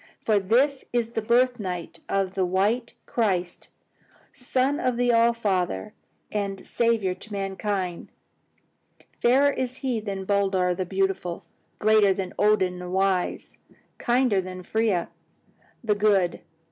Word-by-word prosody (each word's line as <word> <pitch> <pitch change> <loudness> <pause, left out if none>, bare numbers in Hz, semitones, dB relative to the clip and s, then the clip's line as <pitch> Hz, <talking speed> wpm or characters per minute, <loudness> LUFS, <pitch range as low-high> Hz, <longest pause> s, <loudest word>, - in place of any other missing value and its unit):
For 215 -2 +3
this 260 +8 +2
is 235 -2 0
the 230 -1 -3
birth 245 +2 +2
night 180 -4 -5
of 195 -1 0
the 190 - 0
white 205 +7 0
Christ, 185 -6 -1 0.7
son 260 +3 0
of 250 -6 0
the 245 0 +2
All 230 0 +5
Father, 185 - -1 0.4
and 200 -2 -3
Saviour 230 -5 +1
of 210 +4 -9
mankind. 195 -2 -3 1.1
Fairer 270 +4 +4
is 255 -1 -3
He 245 -4 0
than 195 -3 -5
Baldur 190 -2 +1
the 185 0 -3
Beautiful, 190 -2 -1 0.3
greater 210 -2 +4
than 190 -2 -4
Odin 190 -4 +2
the 180 0 -7
Wise, 190 -1 -1 0.4
kinder 240 -5 +2
than 185 0 -8
Freya 215 -4 0 0.7
the 215 -2 +2
Good. 205 -4 +2
200 Hz, 130 wpm, -25 LUFS, 185-235 Hz, 1.1 s, All